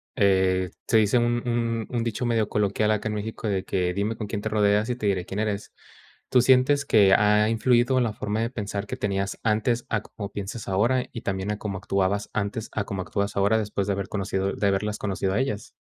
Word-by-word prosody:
eh, 95 -2 +2 0.2
se 115 - +4
dice 110 +3 +4
un 120 0 +1
un 115 -1 -1
un 120 -2 -1
dicho 115 +2 -2
medio 115 -3 +1
coloquial 105 +1 +1
acá 110 +1 0
en - - -2
México 110 +1 -4
de 95 -2 0
que, 90 -2 -1
"Dime 105 +3 -1
con 110 - -5
quién 105 0 -4
te 110 - -2
rodeas 105 +1 +2
y 125 - 0
te 110 - -5
diré 95 -3 +1
quién 100 - -5
eres", 105 -2 -2 0.6
¿tú 125 - +5
sientes 130 +3 +4
que 100 -7 +5
ha 105 +1 +4
influido 120 +3 +3
en 120 - +2
la 110 - -2
forma 105 +1 -3
de 115 - 0
pensar 100 -4 -4
que - - -5
tenías 100 -1 -2
antes 115 +2 +1
a 110 -2 0
como 100 -2 -8
piensas 105 +3 -6
ahora, 115 +7 +2
y 115 - -7
también 95 +1 -2
a 105 - -4
cómo 100 -3 -4
actuabas 100 +1 -1
antes 105 +1 -3
a 100 - -1
cómo 95 -2 -4
actúas 100 +2 -2
ahora 100 +3 +3
después 105 -2 -2
de 100 - +1
haber 100 -1 -3
conocido 100 -1 -1
de 100 - 0
haberlas 105 +2 0
conocido 95 -1 -1
a - - +2
ellas? 130 -6 -2
105 Hz, 230 wpm, -25 LUFS, 100-115 Hz, 0.6 s, tú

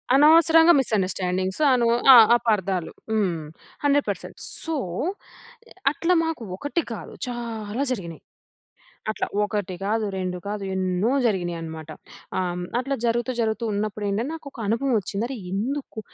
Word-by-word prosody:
అనవసరంగా 325 +3 +7
మిసండర్‌స్టాండింగ్స్ 185 -2 -1
అనువ్ 235 -2 +3 0.2
ఆ - - +11 0.2
అపార్దాలు. 195 -7 -1 0.2
హ్మ్. 175 -7 0 0.4
100% 285 0 0 0.3
సో! 325 -1 -2 1.2
అట్లా 350 +3 +1
మాకు 320 -8 -3
ఒకటి 290 - -1
కాదు, - - -9
చాలా 230 0 -4
జరిగినాయి. 170 -7 -7 0.9
అట్లా 215 - -2 0.2
ఒకటి 205 -3 -2
కాదు, 215 +2 0
రెండు 185 -1 -3
కాదు, 205 -1 -3
ఎన్నో 185 +4 0
జరిగినాయి 175 -6 0
అనమాట. 160 -1 -7 0.5
ఆహ్, 185 -1 0
హ్మ్. 180 0 -4 0.2
అట్లా 270 +2 -1
జరుగుతూ 240 +2 0
జరుగుతూ 225 0 0
ఉన్నప్పుడేంటంటే 210 +2 -2
నాకు 315 -3 -8
ఒక 240 - -13
అనుభవం 250 +5 0
వచ్చింది. 200 +2 -3
అరె! 265 -2 -5
ఎందుకు 245 +4 -3
215 Hz, 125 wpm, -24 LUFS, 185-255 Hz, 1.2 s, ఆ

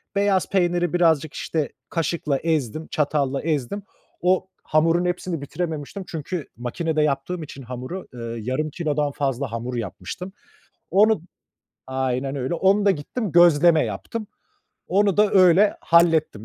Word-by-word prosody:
beyaz 200 -2 +2
peyniri 175 -2 +1
birazcık, 160 -4 +2
işte, 155 -3 -2 0.2
kaşıkla 160 -4 -1
ezdim, 155 -1 -1
çatalla 140 -2 0
ezdim. 155 +5 -2 0.4
O 185 +1 +2 0.2
hamurun 165 +3 +2
hepsini 180 -2 -2
bitirememiştim 160 +4 -4
çünkü 160 0 -5
makinede 155 +6 -1
yaptığım 150 +4 -1
için 140 -2 -10
hamuru, 130 +9 -6
eee, 125 - -9 0.2
yarım 130 +7 -2
kilodan 150 -2 -1
fazla 135 -3 -2
hamur 120 +2 -4
yapmıştım. 115 - -6 0.6
Onu 210 +1 +4 0.7
aynen 130 +1 -2
öyle, 130 +5 -2
onu 195 +4 +3
da 200 - +5
gittim, 190 +5 -3
gözleme 170 -2 +6
yaptım. 230 -2 -5 0.6
Onu 200 +1 +2
da 210 -1 +4
öyle 185 +2 +5
hallettim. 165 -9 +3
160 Hz, 130 wpm, -23 LUFS, 140-180 Hz, 0.7 s, gözleme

